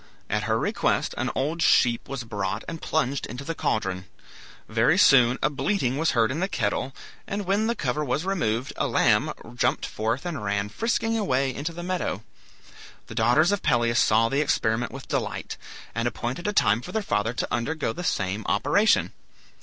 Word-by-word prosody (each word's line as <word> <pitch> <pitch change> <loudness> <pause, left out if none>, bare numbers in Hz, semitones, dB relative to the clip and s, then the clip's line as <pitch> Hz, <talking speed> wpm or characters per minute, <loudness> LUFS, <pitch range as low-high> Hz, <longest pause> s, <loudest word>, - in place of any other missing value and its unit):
At 105 +1 0
her 110 0 +1
request - - 0
an - - -1
old 155 +5 -1
sheep 120 -6 +3
was 135 -2 -4
brought 100 -4 -3
and 165 -1 -6
plunged 140 -3 -1
into 125 +3 -7
the 165 - -3
caldron. 95 - -1 0.6
Very 115 +10 +3
soon 125 -9 +6
a 135 - +4
bleating 140 -3 0
was 160 +2 +1
heard 115 +1 +3
in 150 - -3
the 190 - +1
kettle, 130 - -2 0.3
and 200 0 -3
when 200 +4 +1
the 235 - 0
cover 145 - -1
was 145 +4 -1
removed, 135 - -1
a - - +1
lamb - - +3 0.2
jumped - - 0
forth 115 +8 -2
and 155 -10 -4
ran 100 0 -1
frisking 225 - 0
away 135 -9 +1
into 145 +6 -4
the 175 +1 -7
meadow. 175 - -2 0.8
The - - -10
daughters 125 - +3
of 205 - 0
Pelias 120 0 +2
saw 115 +1 +4
the 140 +5 +1
experiment 115 -4 0
with 135 0 -9
delight, - - -3 0.4
and 115 +1 -1
appointed 120 - -3
a - - +1
time 110 - +3
for - - -8
their 220 -1 -1
father 115 - 0
to - - -2
undergo 120 +1 -1
the 180 - -6
same 105 - -1
operation. 145 - +2
130 Hz, 185 wpm, -25 LUFS, 115-165 Hz, 0.8 s, soon